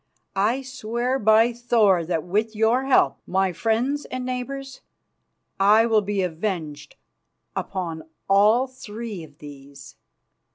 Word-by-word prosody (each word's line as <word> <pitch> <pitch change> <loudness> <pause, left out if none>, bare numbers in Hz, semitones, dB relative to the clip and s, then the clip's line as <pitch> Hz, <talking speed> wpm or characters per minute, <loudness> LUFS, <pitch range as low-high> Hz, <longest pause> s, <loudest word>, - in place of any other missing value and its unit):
I 225 +7 +1
swear 250 0 -2
by 220 +2 +4
Thor 225 -7 +2
that, 165 -3 -1
with 215 +5 -1
your 225 +5 +2
help, 255 - +3
my 190 0 +1
friends 240 - -1
and 255 0 -5
neighbours, 270 +1 -5 0.8
I 210 +3 +5
will 220 -2 +3
be 200 -1 -1
avenged 165 -4 -4 0.6
upon 165 -4 -5 0.2
all 210 +6 +4
three 225 -6 -8
of 145 -2 -15
these. 140 -2 -13
215 Hz, 120 wpm, -23 LUFS, 180-245 Hz, 0.8 s, I